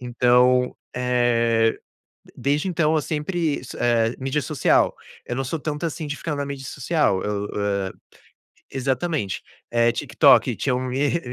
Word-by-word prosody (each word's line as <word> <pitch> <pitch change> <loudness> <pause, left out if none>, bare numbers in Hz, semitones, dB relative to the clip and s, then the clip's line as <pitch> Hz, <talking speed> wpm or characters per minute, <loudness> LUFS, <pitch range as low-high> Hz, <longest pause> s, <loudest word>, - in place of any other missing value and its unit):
Então, 125 +1 +3 0.2
eh, 115 -2 +2 0.6
desde 145 +6 0
então, 160 -3 +1
eu 155 - +2
sempre 155 0 -1
isso, 125 - -9
eh, 115 -1 +2
mídia 135 +3 -1
social, 150 -5 +2 0.3
eu 120 - -3
não 135 - -1
sou 150 +6 -3
tanto 150 +1 -4
assim 160 0 -4
de 145 - -4
ficar 150 -1 -4
na 140 - -2
mídia 140 -1 -6
social. 135 - 0
Eu, 105 0 -2
eh, 100 -2 -1 0.8
exatamente, 135 - -2 0.3
eh, 120 0 +4
TikTok, - - +4
tinham 125 -3 0
me 130 +3 0
re 170 - +1
130 Hz, 150 wpm, -23 LUFS, 120-150 Hz, 0.8 s, eh